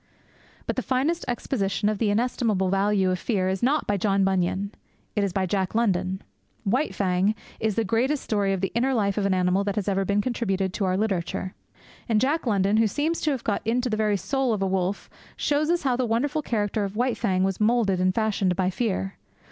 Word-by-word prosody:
But - - -3
the - - +1
finest 280 +7 0
exposition 215 -4 -1
of 210 -1 0
the 220 - +2
inestimable 215 -3 +1
value 195 -1 +2
of 185 - -1
fear 190 -4 0
is 190 0 -2
not 285 +5 +2
by 205 - 0
John 195 0 +2
Bunyan. 190 +1 0 0.4
It 205 - +2
is 200 - 0
by 190 +1 0
Jack 190 +1 -1
London. 190 -4 0 0.4
White 250 +9 0
Fang 190 +2 +1 0.2
is 220 -2 0
the 225 - +1
greatest 245 +8 0
story 205 -2 0
of 190 -2 -1
the 195 - -1
inner 255 +3 +1
life 200 -2 +1
of 200 - +1
an 195 - +2
animal 185 +2 +2
that 200 -1 -2
has 210 -2 -2
ever 195 -1 +1
been 200 +2 +1
contributed 195 -5 -1
to 200 - -1
our 185 0 +1
literature. 190 -3 -2 0.6
And 220 -2 +3
Jack 280 +4 0
London, 200 -1 +2
who 225 0 +4
seems 305 +10 -1
to 310 - +1
have 265 -5 -2
got 205 - -1
into 245 +2 0
the - - +1
very 210 -2 +2
soul 265 +5 0
of 200 -2 -1
a - - +1
wolf, 190 +1 -1 0.3
shows 295 +1 +1
us 345 -1 +1
how 260 -3 +2
the 255 - 0
wonderful 275 +7 0
character 210 -5 -1
of 200 0 -4
White 245 +2 +1
Fang 190 -5 +1
was 195 -1 -1
moulded 210 -4 +2
and 185 0 +2
fashioned 205 -5 +1
by 185 0 +1
fear. 195 -2 -2
205 Hz, 220 wpm, -25 LUFS, 190-235 Hz, 0.6 s, who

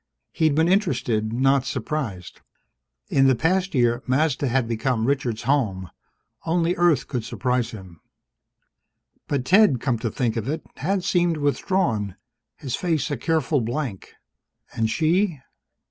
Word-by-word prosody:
He'd 155 -3 +1
been 160 +2 +3
interested, 125 - +1
not 135 +2 +2
surprised. 130 - -4 0.7
In 135 -1 +4
the 130 - +4
past 180 +5 0
year, 120 -1 +2
Mazda 140 +1 +1
had 125 -1 +1
become 115 0 -1
Richard's 125 -4 -1
home; 110 - 0 0.5
only 170 +1 +1
Earth 165 -7 +2
could 125 -4 -3
surprise 125 0 -1
him. 95 -6 -11 1.3
But, 135 -3 -1
Ted, 185 - +5
come 120 -2 -1
to 115 - -2
think 115 +1 -1
of 115 +1 -3
it, 155 +3 -3
had 185 +6 -1
seemed 175 -2 +1
withdrawn, 145 - 0 0.4
his 130 -3 -4
face 165 -3 -1
a - - 0
careful 155 0 0
blank. 120 -3 -4 0.6
And 110 -1 0
she? 170 - +1
135 Hz, 135 wpm, -23 LUFS, 115-160 Hz, 1.3 s, Ted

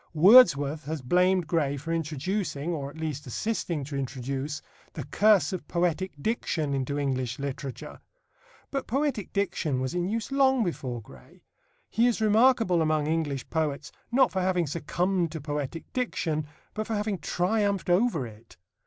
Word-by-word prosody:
Wordsworth 155 - +6
has 155 -2 -4
blamed 180 +5 +3
Gray 150 -4 0
for 165 +4 -4
introducing, 160 0 -2
or 140 -3 -4
at 145 - -13
least, 155 -3 -4
assisting 170 - -2
to 140 +1 -6
introduce, 135 +2 -4 0.3
the - - -5
curse 210 -2 +3
of 175 -5 -5
poetic 180 +1 0
diction 155 -6 -1
into 135 +1 -1
English 130 -4 -1
literature. 140 -1 -6 0.7
But 275 -1 -3
poetic 265 -4 -1
diction 165 -9 -1
was 130 +3 -2
in 175 0 -1
use 225 +4 -3
long 265 -3 +4
before 130 - -4
Gray. 65 -9 -17 0.4
He 235 +2 +2
is 240 - +1
remarkable 220 -4 +4
among 155 -1 +1
English 150 -4 -1
poets, 155 -3 -1 0.2
not 260 +1 +4
for 190 - -1
having 180 -2 +1
succumbed 170 +3 -1
to 160 - -4
poetic 150 +2 -4
diction, 160 -11 -1 0.3
but 215 0 -3
for 225 - -1
having 205 -2 -1
triumphed 200 +5 0
over 180 - +2
it. 110 0 -14
165 Hz, 155 wpm, -27 LUFS, 140-200 Hz, 0.7 s, Wordsworth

